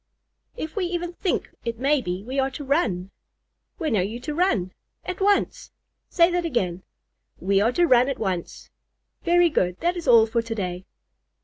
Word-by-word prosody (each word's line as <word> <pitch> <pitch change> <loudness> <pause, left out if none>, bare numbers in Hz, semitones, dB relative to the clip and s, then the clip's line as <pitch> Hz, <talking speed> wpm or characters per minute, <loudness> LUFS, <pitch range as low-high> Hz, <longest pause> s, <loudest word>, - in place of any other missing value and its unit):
"If 315 -8 -5
we 395 -4 0
even 350 0 -3
think 365 +1 -2
it 230 -1 -3
may 275 +3 +2
be, 180 -2 -4
we 260 +4 -3
are 265 0 +2
to 270 +2 -7
run." 220 - 0 0.7
"When 315 - -1
are 195 - +3
you 215 +6 -3
to 300 - -4
run?" 230 - +1 0.3
"At 365 +1 -5
once." 400 0 +1 0.4
"Say 340 0 +4
that 350 0 0
again." 190 - -1 0.6
"We 195 +2 +2
are 225 +3 +3
to 350 - +3
run 250 -3 +4
at 270 - -2
once." 185 -5 -4 0.5
"Very 345 -1 +4
good. 180 -9 0
That 345 +2 +1
is 340 -4 -6
all 230 -3 +7
for 230 +1 0
to 230 0 -5
day." 180 -2 -4
255 Hz, 185 wpm, -24 LUFS, -, 0.7 s, all